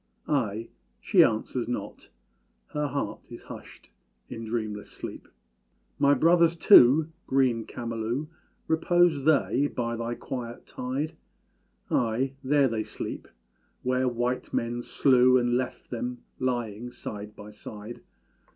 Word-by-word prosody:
Ay! 115 -6 0 0.3
she - - +5
answers 115 +2 -1
not 105 -4 -5 0.6
Her 150 0 -1
heart 140 0 -4
is - - -9
hushed - - -12 0.4
in 115 - -6
dreamless 110 -2 -3
sleep. - - -8 0.7
My 140 0 +5
brothers 170 +3 +4
too 155 -3 +7 0.2
green 130 -4 +2
Camalú, 115 +3 -3 0.4
Repose 160 -2 +3
they 145 -2 +3
by 120 -4 -3
thy 115 +1 -3
quiet 120 -2 -6
tide? 135 +5 -4 0.8
Ay! 125 +3 +1
there 140 +1 +4
they 115 -3 -1
sleep - - -6 0.6
where 130 0 +1
white 125 +1 -1
men 120 +1 -1
slew 130 0 +4
And 120 -1 +1
left 125 0 -3
them 125 0 -4 0.2
lying 120 -3 -2
side 105 -3 -8
by 105 0 -10
side. 105 +2 -9
125 Hz, 120 wpm, -27 LUFS, 115-140 Hz, 0.8 s, too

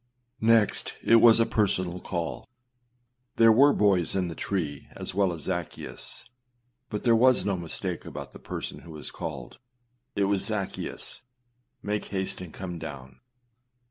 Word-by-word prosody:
2. 110 - -1
Next 115 -2 +3
it 115 - +6
was 115 0 +7
a 115 - +5
personal 95 -5 0
call. 85 +2 -4 0.9
There 115 -1 +7
were 140 +6 +7
boys 100 - +2
in 90 -2 0
the - - -5
tree 80 -5 -3
as - - -5
well 95 -1 +2
as 80 -3 -6
Zaccheus 85 -3 -4 0.7
but 105 - -4
there 115 -2 +5
was 125 +2 +5
no 100 -2 +1
mistake 85 -3 -4
about - - -8
the - - -12
person - - -6
who 85 - -12
was 75 - -7
called. 65 -6 -7 0.6
It 100 - +2
was, 100 -1 +2
â 105 -3 0
Zaccheus, - - -6 0.6
make 105 0 -2
haste 95 -1 -2
and 90 -3 -8
come 90 -1 -6
down. 65 -5 -8
95 Hz, 160 wpm, -27 LUFS, 85-110 Hz, 0.9 s, was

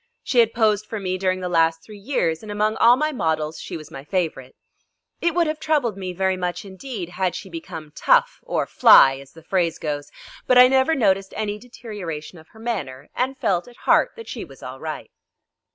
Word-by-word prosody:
She 255 - +1
had 230 -1 +5
posed 215 -2 +2
for 220 - -4
me 185 -1 -2
during 185 -1 0
the 180 - -2
last 165 -1 +2
three 210 -2 -12
years, 195 - -1
and 215 - -8
among 210 +1 0
all 235 +1 +6
my 305 +4 0
models 160 - -1
she - - -6
was 155 -2 -12
my 135 - -8
favourite. 150 -6 -3 0.7
It 340 -1 +1
would 345 -1 +3
have 310 0 -2
troubled 295 -9 0
me 185 -2 -5
very 190 +1 0
much 180 +1 -3
indeed 195 -1 -7
had 180 0 -1
she 190 - -8
become 165 -3 -8
"tough" - - +3
or - - -1
"fly," 135 0 +7
as 140 0 -14
the 165 - -15
phrase 170 -2 0
goes, 145 -2 -4 0.4
but 255 - +5
I 250 0 +10
never 265 +4 +3
noticed 195 -5 +1
any 210 -1 -2
deterioration 200 -9 -8
of 160 - -17
her 220 - -18
manner, 185 - -5
and 260 +2 -1
felt 180 0 0
at 245 - -15
heart - - +3
that 460 -1 -10
she - - -6
was - - -14
all - - -8
right. - - -6
190 Hz, 210 wpm, -22 LUFS, 165-235 Hz, 0.7 s, I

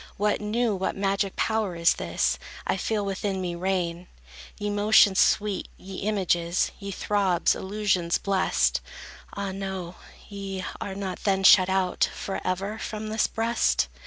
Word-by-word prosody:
What 210 +1 +1
new, 220 +1 0
what 190 - -2
magic 195 0 0
power 220 -5 0
is 170 0 +4
this, - - -1 0.3
I - - +1
feel 205 +2 -1
within 195 0 -2
me 180 -2 -3
reign? 175 -1 -2 0.5
Ye 205 0 -2
motions 205 -1 +5
sweet, 205 -2 +2
ye 190 0 -9
images, 180 -4 0
Ye 200 -1 -6
throbs, 195 -2 +1
illusions 190 -4 0
blest, 70 - +1 0.5
Ah, 200 -1 -3
no,—ye 190 +1 -7 0.2
are 195 - -4
not 195 -2 -4
then 195 -1 +1
shut 190 -1 +7
out 190 -1 +1
Forever 195 +2 -3
from 215 0 -5
this 220 0 +1
breast? 230 +1 +1
195 Hz, 135 wpm, -26 LUFS, 185-205 Hz, 0.5 s, shut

